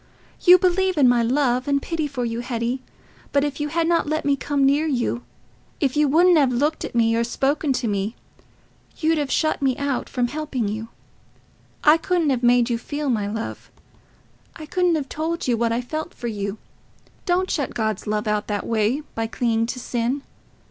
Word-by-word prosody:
You 360 0 +8
believe 370 0 +1
in 275 -3 +6
my 245 -1 +4
love 255 +1 +1
and 280 -1 +2
pity 315 +1 -2
for 260 -4 -3
you, 230 0 -3
Hetty, 240 +1 -2 0.5
but 280 0 +2
if 290 -1 -3
you 295 - -1
had 330 +2 0
not 335 -3 +1
let 310 -1 -1
me 285 -1 +3
come 280 0 0
near 290 +3 +3
you, 240 - -1 0.6
if 270 -1 0
you 300 0 +3
wouldn't 340 +4 +5
have 270 -3 +3
looked 290 +6 0
at - - -6
me 230 -1 +3
or 230 - +2
spoken 275 +5 0
to 250 - -1
me, 205 +2 -2 0.8
you'd 320 0 +1
have 290 -2 -2
shut 310 -2 +1
me 265 -2 +1
out 280 -2 -2
from 245 -2 -1
helping 285 -5 -3
you. 220 +2 -4 1.0
I 305 +2 +7
couldn't 330 -3 +1
have 250 -2 0
made 245 -1 +4
you 235 -2 -1
feel 290 +2 -3
my 210 -4 0
love; 220 +2 -5 0.9
I 310 - -8
couldn't 360 +1 +1
have 290 -3 -2
told 325 +3 -3
you 245 - +3
what 230 0 0
I 235 +2 0
felt 310 +7 -5
for 240 - -5
you. 205 -2 -3 0.7
Don't 370 +1 +1
shut 285 -4 -2
God's 215 -3 -2
love 210 0 -1
out 210 -1 0
in 210 - -2
that 205 - -4
way, 225 +5 +1
by 225 0 -2
clinging 230 -1 0
to 250 - -4
sin.... 245 +3 -2
265 Hz, 200 wpm, -23 LUFS, 235-305 Hz, 1.0 s, You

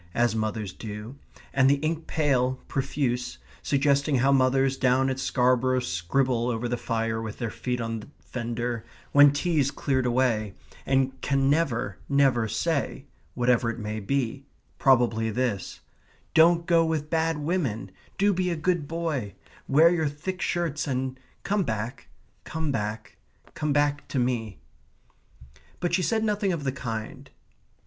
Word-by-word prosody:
as 120 -2 +2
mothers 110 -3 -2
do, 105 +3 -7 0.4
and 135 0 +4
the 140 - +5
ink 155 +3 -3
pale, 130 -4 +1
profuse, 130 - -2 0.2
suggesting 140 0 +2
how 135 +2 +3
mothers 135 0 +3
down 130 0 +2
at 130 - -3
Scarborough 130 0 +2
scribble 120 +6 0
over 120 0 -2
the 120 - -1
fire 115 -1 -2
with 110 -2 -6
their 115 -3 -3
feet 125 -1 -3
on 115 -1 -3
the 105 - -11
fender, 120 -1 -4 0.3
when 145 0 +8
tea's 145 -1 +1
cleared 130 -3 0
away, 120 -5 +1 0.3
and 135 0 +1
can 135 0 +2
never, 120 - 0
never 135 -5 +3
say, 140 +4 -1 0.3
whatever 120 -1 +2
it 115 - -4
may 110 -1 -4
be 130 +4 -2 0.4
probably 120 -4 +3
this 120 -3 -2 0.5
Don't 170 +1 +5
go 170 -2 +4
with 155 -2 -2
bad 165 -1 +1
women, 145 - -2 0.3
do 200 +1 +3
be 180 0 0
a 170 - 0
good 165 -1 0
boy; 155 - -3 0.3
wear 155 +5 +6
your 160 -3 +1
thick 185 +6 -5
shirts; 165 -4 -1
and 130 -1 -2 0.2
come 205 0 +1
back, 110 0 -4 0.4
come 160 -2 -3
back, 105 -2 -4 0.4
come 150 -1 -2
back 145 0 +1
to - - -4
me. 120 -5 -1 1.2
But 175 -1 -1
she 185 - +3
said 220 +4 +1
nothing 210 -2 +1
of 165 -5 -3
the 135 - 0
kind. 125 +1 -6
130 Hz, 150 wpm, -26 LUFS, 115-150 Hz, 1.2 s, when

